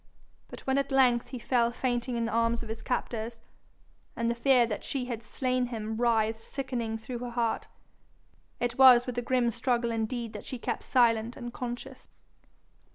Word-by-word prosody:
But -, -, -10 dB
when 265 Hz, +1 st, +1 dB
at 275 Hz, -, -2 dB
length 250 Hz, -3 st, +4 dB
he 255 Hz, -, -6 dB
fell 235 Hz, 0 st, +2 dB
fainting 245 Hz, 0 st, -1 dB
in 230 Hz, -, 0 dB
the 230 Hz, -, -2 dB
arms 230 Hz, 0 st, +1 dB
of 225 Hz, -, -10 dB
his 220 Hz, 0 st, -5 dB
captors, 230 Hz, -1 st, -3 dB, 0.8 s
and 235 Hz, 0 st, 0 dB
the -, -, +1 dB
fear 245 Hz, 0 st, +4 dB
that 215 Hz, -2 st, -4 dB
she 265 Hz, -3 st, -3 dB
had 235 Hz, -3 st, -4 dB
slain 255 Hz, +1 st, -1 dB
him 220 Hz, -2 st, -4 dB
writhed 225 Hz, -1 st, +2 dB
sickening 240 Hz, -3 st, -4 dB
through 235 Hz, +2 st, -6 dB
her 245 Hz, 0 st, -5 dB
heart, 235 Hz, -1 st, -1 dB, 0.9 s
it 245 Hz, +1 st, -2 dB
was 250 Hz, -2 st, +8 dB
with 245 Hz, -1 st, -3 dB
a -, -, -2 dB
grim 245 Hz, -1 st, +1 dB
struggle 235 Hz, 0 st, 0 dB
indeed 230 Hz, 0 st, -2 dB
that 210 Hz, -, -8 dB
she 255 Hz, -, -4 dB
kept -, -, -4 dB
silent 235 Hz, -2 st, +2 dB
and 240 Hz, 0 st, -6 dB
conscious. 250 Hz, +2 st, -6 dB
240 Hz, 180 wpm, -29 LUFS, 230-250 Hz, 0.9 s, was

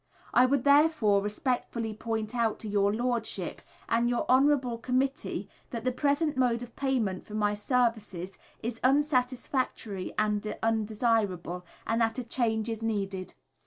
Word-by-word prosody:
I 250 Hz, +1 st, +6 dB
would 270 Hz, -1 st, +1 dB
therefore 280 Hz, -8 st, +4 dB
respectfully 225 Hz, +1 st, -2 dB
point 220 Hz, 0 st, -3 dB
out 230 Hz, -3 st, +1 dB
to 220 Hz, -, -5 dB
your 200 Hz, -1 st, +2 dB
Lordship 235 Hz, 0 st, -2 dB, 0.3 s
and 235 Hz, +1 st, +2 dB
your 240 Hz, -, 0 dB
Honourable 260 Hz, -2 st, +3 dB
Committee 255 Hz, +3 st, -1 dB, 0.2 s
that 230 Hz, -3 st, -5 dB
the 255 Hz, -, +1 dB
present 285 Hz, +4 st, +1 dB
mode 245 Hz, -2 st, +1 dB
of 240 Hz, -1 st, -11 dB
payment 240 Hz, -9 st, 0 dB
for 210 Hz, -, -9 dB
my 210 Hz, -1 st, +2 dB
services 210 Hz, -5 st, -1 dB, 0.2 s
is 230 Hz, 0 st, -3 dB
unsatisfactory 255 Hz, -6 st, 0 dB
and 210 Hz, 0 st, 0 dB
undesirable, 215 Hz, -5 st, 0 dB, 0.2 s
and 225 Hz, +1 st, +1 dB
that 225 Hz, +1 st, +1 dB
a 255 Hz, -, -2 dB
change 225 Hz, -2 st, 0 dB
is 225 Hz, -1 st, -3 dB
needed. 195 Hz, -4 st, -3 dB
230 Hz, 140 wpm, -29 LUFS, 210-255 Hz, 0.3 s, I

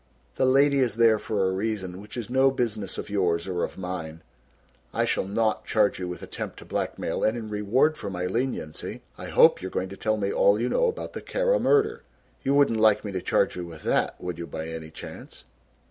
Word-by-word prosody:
The 130 Hz, -, +1 dB
lady 140 Hz, +2 st, +4 dB
is 125 Hz, -4 st, +1 dB
there 115 Hz, -2 st, +5 dB
for 100 Hz, -3 st, -1 dB
a 95 Hz, -, +1 dB
reason 95 Hz, -2 st, -3 dB
which 105 Hz, +4 st, -10 dB
is 120 Hz, -, -4 dB
no 130 Hz, +2 st, +4 dB
business 110 Hz, -7 st, -2 dB
of -, -, -5 dB
yours 90 Hz, -4 st, +1 dB
or 90 Hz, -2 st, -1 dB
of -, -, -4 dB
mine. 85 Hz, -4 st, -5 dB, 0.7 s
I -, -, +2 dB
shall -, -, 0 dB
not 110 Hz, +2 st, 0 dB
charge 105 Hz, -3 st, +2 dB
you 90 Hz, -, -3 dB
with 90 Hz, 0 st, -6 dB
attempt -, -, -6 dB
to -, -, -11 dB
blackmail -, -, -2 dB
and 110 Hz, +2 st, +2 dB
in 110 Hz, -2 st, -6 dB
reward 115 Hz, +9 st, +2 dB
for 100 Hz, -, -4 dB
my 90 Hz, -1 st, -3 dB
leniency 95 Hz, -6 st, -3 dB
I -, -, -8 dB
hope -, -, +5 dB
you 95 Hz, -, -4 dB
are -, -, -5 dB
going 95 Hz, 0 st, -2 dB
to 100 Hz, -, -9 dB
tell 110 Hz, 0 st, 0 dB
me 100 Hz, -1 st, -1 dB
all 100 Hz, +1 st, +4 dB
you 120 Hz, +2 st, 0 dB
know -, -, +2 dB
about 460 Hz, -, -4 dB
the -, -, -6 dB
Kara -, -, +1 dB
murder. 435 Hz, +1 st, +2 dB, 0.4 s
You 140 Hz, -, +1 dB
wouldn't 140 Hz, -6 st, +4 dB
like 110 Hz, -1 st, +4 dB
me 100 Hz, -, -3 dB
to 95 Hz, -1 st, -3 dB
charge -, -, +1 dB
you 90 Hz, -1 st, -5 dB
with 80 Hz, -2 st, -11 dB
that, -, -, +1 dB
would 90 Hz, -2 st, -5 dB
you 85 Hz, -, -5 dB
by 80 Hz, +1 st, -5 dB
any 80 Hz, -1 st, -6 dB
chance!" 80 Hz, -, -10 dB
105 Hz, 225 wpm, -26 LUFS, 90-120 Hz, 0.7 s, there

